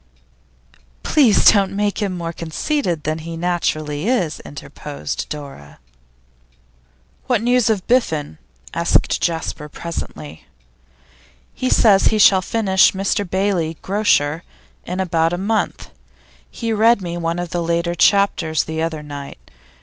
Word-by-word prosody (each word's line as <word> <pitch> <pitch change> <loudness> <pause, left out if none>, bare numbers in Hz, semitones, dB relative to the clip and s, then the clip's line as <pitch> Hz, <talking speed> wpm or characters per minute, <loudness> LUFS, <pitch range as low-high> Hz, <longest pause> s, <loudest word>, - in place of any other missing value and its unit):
'Please 260 -9 +4
don't 195 -2 +5
make 205 +1 -1
him 190 -3 -2
more 170 -1 -4
conceited 170 - -2
than 155 +1 -2
he 165 +1 -7
naturally 160 -2 -2
is,' 185 -11 0
interposed 75 0 -7
Dora. 140 - -9 1.5
'What 240 -4 +1
news 245 -1 +3
of 205 -4 0
Biffen?' 160 - 0 0.3
asked - - +1
Jasper, 160 -2 -3
presently. 80 - -7 1.1
'He 255 - -2
says 200 -4 +4
he 220 - +3
shall 195 -2 +6
finish 190 -2 +3
"Mr 195 0 -1
Bailey, 185 -4 -1
Grocer," 175 -6 +1 0.5
in 180 +1 -4
about 165 -2 +1
a - - -1
month. 205 - -2 0.6
He 230 -1 -3
read 220 -1 +3
me 170 -1 -4
one 170 0 -2
of 175 -1 -4
the 175 - -1
later 170 +1 -1
chapters 175 -3 +2
the 160 0 -4
other 160 -2 -3
night. 140 - -10
175 Hz, 125 wpm, -19 LUFS, 160-205 Hz, 1.5 s, shall